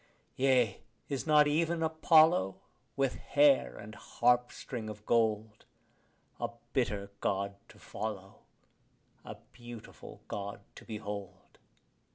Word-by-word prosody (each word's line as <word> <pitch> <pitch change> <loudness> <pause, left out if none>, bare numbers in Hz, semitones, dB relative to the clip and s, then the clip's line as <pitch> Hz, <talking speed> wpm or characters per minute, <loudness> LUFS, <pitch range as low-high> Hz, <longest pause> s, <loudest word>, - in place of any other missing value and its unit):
Yea, 130 -5 +2 0.3
is 140 +1 -3
not 150 -1 +6
even 165 +2 +1
Apollo, 160 - +4 0.4
with 135 -2 0
hair 135 - +3
and 110 - -9
harpstring 120 -1 0
of 105 0 -10
gold, 110 -2 +1 0.8
A - - -2 0.2
bitter 100 -6 -1
God 100 0 -1 0.2
to - - -16
follow, 100 -3 -6 0.8
a - - -8 0.2
beautiful 120 -2 -11
God 100 0 -5
to - - -13
behold? 105 -3 -7
115 Hz, 105 wpm, -31 LUFS, 105-140 Hz, 0.8 s, not